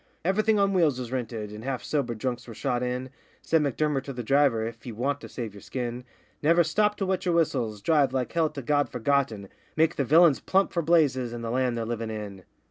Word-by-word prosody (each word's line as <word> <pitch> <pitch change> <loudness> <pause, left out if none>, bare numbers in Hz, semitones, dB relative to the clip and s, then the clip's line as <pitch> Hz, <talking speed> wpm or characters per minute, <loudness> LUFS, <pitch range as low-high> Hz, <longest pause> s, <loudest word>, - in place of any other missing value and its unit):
Everything 215 +4 +2
on 200 -1 +2
wheels 160 -8 +3
was 125 -2 -6
'rinted,' 115 -5 -4
and 105 +1 -9
half 130 -1 -3
sobered 125 -6 -1
drunks 120 +1 -3
were 115 - -9
shot 125 -1 -1
in; 125 +1 -3 0.3
Said 160 -1 +2
M'Durmer 145 0 0
to 140 - -7
the 125 -2 -5
driver, 135 -3 +3
'If 115 0 -7
ye 120 - -6
want 135 +6 -2
to - - -9
save 115 -5 -6
yer 100 - -12
skin, 125 -1 -5 0.4
Never 170 +3 +4
stop 210 +6 +1
to 195 - -1
wet 190 -1 -1
yer 175 - +2
whistles 120 -11 0
drive 145 -3 +3
like 130 -2 -2
hell 165 -2 +1
to 145 -3 -7
God 145 +2 +1
Forgotten, 120 -5 0 0.3
Make 160 +1 +2
the 140 - +2
villains 155 +2 +5
plump 195 +1 +1
for 170 - +1
Blazes, 145 -7 +2
and 120 -1 -6
the 115 - -3
land 125 -1 0
they're 115 - -2
livin' 115 -1 -3
in. 105 -4 -7
130 Hz, 225 wpm, -27 LUFS, 115-155 Hz, 0.4 s, villains